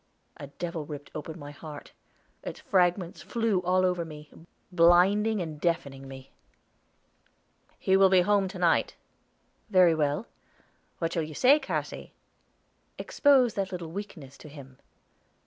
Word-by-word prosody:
A 145 - -8
devil 165 +2 -5
ripped 145 -1 -9
open 155 +2 -7
my 145 -2 -9
heart; 150 0 -10 0.5
its - - -7
fragments 180 -2 0
flew 215 +2 0
all 185 +1 +2
over 180 -2 0
me, 150 -2 -11 0.4
blinding 185 +4 +4
and 155 -2 -8
deafening 140 -6 -2
me. 135 0 -11 1.5
"He 190 - +1
will 195 0 +6
be 185 -1 +5
home 200 +1 +2
to 185 - -8
night." 175 -2 +1 0.7
"Very 185 -4 +5
well." 150 +6 -1 0.7
"What 165 -1 -2
shall 165 - 0
you 155 -1 -6
say, 275 - +5
Cassy?" 270 - -5 0.8
"Expose 265 -5 +3
that 195 -1 -3
little 175 -3 -6
weakness 165 -8 -9
to 150 - -12
him." 135 -3 -13
175 Hz, 135 wpm, -27 LUFS, 150-190 Hz, 1.5 s, will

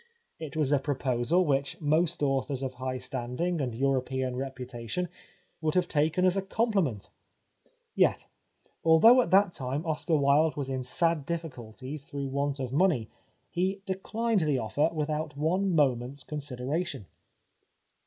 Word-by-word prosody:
It 155 -2 -6
was 150 -3 +1
a 145 - +4
proposal 135 +4 +1
which 140 -2 0
most 160 +2 +1
authors 135 -1 0
of 130 -1 -3
high 130 0 -4
standing 130 +6 -2
and 125 -4 -2
Euro 135 +1 +2
pean 130 -1 -3
reputation 130 +4 -4 0.5
would 155 0 0
have 180 -1 +3
taken 160 +4 +1
as 185 0 +3
a 195 - +1
compli 210 +1 +1
ment. 110 -10 -5 0.8
Yet, - - +2 0.6
although 220 +11 +7
at - - -2
that 195 -1 +4
time 135 +4 -3
Oscar 160 +1 0
Wilde 145 +2 +3
was 135 -2 -3
in 130 -1 -2
sad 165 +4 +1
difficulties 140 -3 -6
through 140 -1 -5
want 140 +1 -1
of 130 -1 -4
money, 150 - +2 0.4
he 190 +3 -1
declined 215 +3 -1
the 150 -5 +1
offer 140 +7 +1
without 155 -1 -3
one 180 +5 +1
moment's 135 -1 +1
consideration. 145 - -4
145 Hz, 145 wpm, -29 LUFS, 130-170 Hz, 0.8 s, although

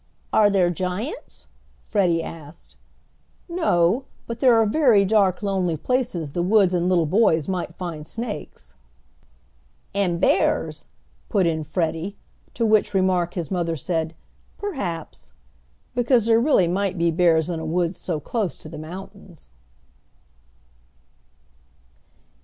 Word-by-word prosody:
"Are 210 -1 +5
there 185 -3 +2
giants?" 185 - -5 0.4
Freddie 175 -6 +1
asked. 160 0 -11 0.7
"No, 260 - +1 0.2
but 230 0 -6
there 250 -2 +5
are 225 -1 +4
very 215 -4 +4
dark 195 -2 +2
lonely 185 -5 0
places 210 - -1
the 175 - -2
woods 190 0 +3
and 175 0 +1
little 175 -3 +3
boys 165 -3 +2
might 180 -3 -3
find 165 -4 -6
snakes." 210 - -7 1.2
"And 185 -4 0
bears!" 285 - +1 0.4
put 200 -5 +2
in 160 -2 0
Freddie, 165 +4 -2 0.4
to 230 - 0
which 215 -2 +2
remark 185 -2 +1
his 175 -2 -4
mother 170 -3 -1
said, 160 +1 -2 0.4
"perhaps," 200 - -5 0.6
because 245 -2 +2
there 230 0 +4
really 240 - +3
might 190 +1 -1
be 170 0 +2
bears 165 -2 +3
in 170 -2 -3
a - - -6
woods 170 +2 -1
so 165 -4 -3
close 205 +4 -3
to 155 - -12
the 160 - -8
mountains. 185 +1 -10
185 Hz, 125 wpm, -23 LUFS, 165-215 Hz, 1.2 s, Are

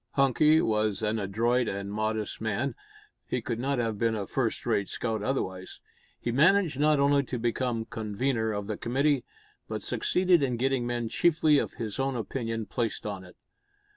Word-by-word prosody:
Hunky 150 +4 +4
was 110 -1 0
an 110 +1 0
adroit 115 +5 +1
and 100 0 -4
modest 110 0 -2
man 110 +5 -1 0.5
he 125 - -1
could 115 0 -4
not 135 +2 0
have 115 -3 -1
been 115 -1 +1
a 100 -2 -3
first - - -2
rate 100 -1 0
scout 110 -3 -2
otherwise! 95 -6 -3 0.4
He 120 - -2
managed 160 +2 +3
not 150 0 +4
only 140 0 +4
to 125 - -4
become 120 0 -1
convener 110 +2 -1
of 105 -1 -3
the 105 0 -4
committee, 135 +2 +1 0.4
but - - -4
succeeded 180 -2 +2
in 125 -3 0
getting 130 -1 0
men 120 -1 -2
chiefly 155 +3 +3
of - - -3
his 110 -1 -5
own 135 0 0
opinion 115 -1 -3
placed 115 +2 -3
on 100 -3 -4
it. 90 - -15
120 Hz, 170 wpm, -28 LUFS, 110-135 Hz, 0.5 s, Hunky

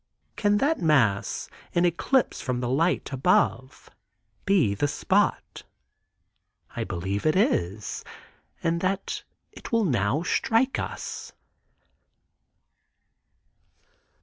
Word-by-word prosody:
Can 205 0 +2
that 290 +7 +1
mass, 130 - +2 0.3
in 175 +1 +3
eclipse 185 +10 +1
from 125 -2 -2
the 125 - -2
light 160 +2 0
above, 135 - +1 0.6
be 180 - +3
the 125 +9 0
spot? - - 0 1.1
I - - -2
believe 95 +3 -3
it 155 - +3
is, 105 - 0 0.6
and 170 0 0
that 195 +1 -2 0.3
it - - -11
will 230 -2 +2
now 125 - +1
strike 230 +7 +1
us. - - -6
160 Hz, 95 wpm, -26 LUFS, 120-195 Hz, 1.1 s, in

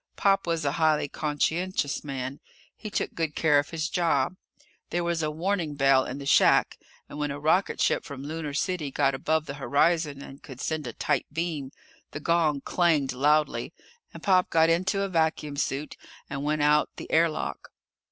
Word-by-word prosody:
Pop 195 -2 +2
was 165 -3 -1
a 140 - +2
highly 155 -1 +2
conscientious 155 +2 -1
man. 135 -1 -5 0.4
He 215 - -7
took - - -2
good 160 -3 -2
care 150 -3 +4
of 145 - -3
his 160 -1 -2
job. 170 -3 +1 0.5
There 175 0 -1
was 170 -1 -1
a 155 - 0
warning 165 -1 -2
bell 135 -1 +4
in 130 - -5
the 140 - -7
shack, - - +4 0.3
and 145 - -9
when 145 0 -1
a 140 +1 -5
rocketship 160 +6 +1
from 140 -4 -8
Lunar 150 -1 -5
City 170 -3 -1
got 135 0 +1
above 155 +3 0
the 140 - -6
horizon 145 +2 +1
and 135 0 -12
could 130 -3 -11
send 155 -2 -3
a 120 - -5
tight - - -1
beam, 160 -4 -3 0.4
the - - -4
gong 155 -3 +1
clanged 155 -7 +1
loudly, 150 +4 +1 0.4
and - - -12
Pop 185 -2 +3
got 160 0 +4
into 190 +4 +1
a - - -1
vacuum 160 -4 0
suit 140 +1 -2 0.3
and 140 0 -5
went 150 0 0
out 150 0 +4
the - - -9
air 165 +1 +4
lock. 155 - -5
150 Hz, 180 wpm, -27 LUFS, 140-165 Hz, 0.5 s, care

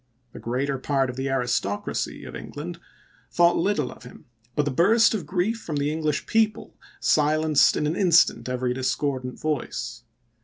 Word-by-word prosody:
The - - -9
greater 135 +3 -2
part 135 -1 0
of - - -12
the 135 +1 -3
aristocracy 125 -6 -2
of - - -9
England 170 +4 -7 0.5
thought 175 0 +4
little 165 -7 0
of - - -14
him, 125 - -13 0.3
but 150 - +2
the 145 - -1
burst 205 - +4
of 185 -9 -3
grief 195 +7 0
from 155 - -5
the 145 +1 0
English 155 -2 -1
people 220 -1 0 0.2
silenced 155 0 +3
in - - 0
an 155 +3 0
instant 170 -8 +3
every 125 -1 -1
discordant 130 0 -2
voice. 60 - -3
145 Hz, 160 wpm, -25 LUFS, 130-170 Hz, 0.5 s, thought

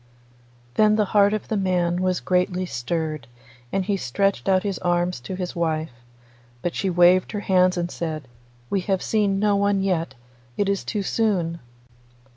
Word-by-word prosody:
Then 215 0 +4
the 215 -1 +2
heart 205 -1 +5
of 215 -1 -3
the 220 - -1
man 180 -3 +1
was 185 -1 0
greatly 180 0 0
stirred, 155 -1 -3 0.4
and 195 -1 0
he 200 0 0
stretched 190 +1 0
out 185 -1 +3
his 200 -3 -2
arms 175 -2 0
to 155 +10 -6
his 180 -1 -4
wife, 160 -3 -1 0.7
but 175 - -1
she 195 - -1
waved 180 +3 +4
her 205 - -2
hands 185 -2 +3
and 175 0 -2
said, 155 -4 -4 0.4
'We 195 - +1
have 190 -1 +1
seen 205 -3 +1
no 205 0 +2
one 200 -1 +1
yet; 165 -7 -1 0.4
it 205 - +1
is 200 -1 0
too 205 -2 -2
soon. 180 -6 0
185 Hz, 170 wpm, -23 LUFS, 170-200 Hz, 0.7 s, heart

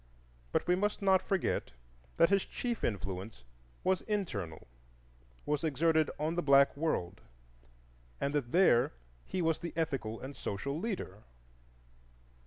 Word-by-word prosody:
But - - +1
we 180 - +3
must 205 +2 -1
not 190 -1 +5
forget 195 -2 -1 0.4
that 170 - +5
his 195 -1 +4
chief 240 -2 -4
influence 95 - -3 0.4
was 185 0 +2
internal,—was 60 - -5
exerted 160 +1 +2
on 155 +2 -1
the 175 - 0
black 140 -2 +5
world; 100 - -1 1.0
and 140 - -1
that 135 -5 -1
there 170 -10 +4 0.3
he 185 - -2
was 160 -1 +1
the 170 - -5
ethical 135 -9 -2
and 135 +2 -7
social 140 +10 -3
leader. 180 - -4
145 Hz, 125 wpm, -32 LUFS, -, 1.0 s, not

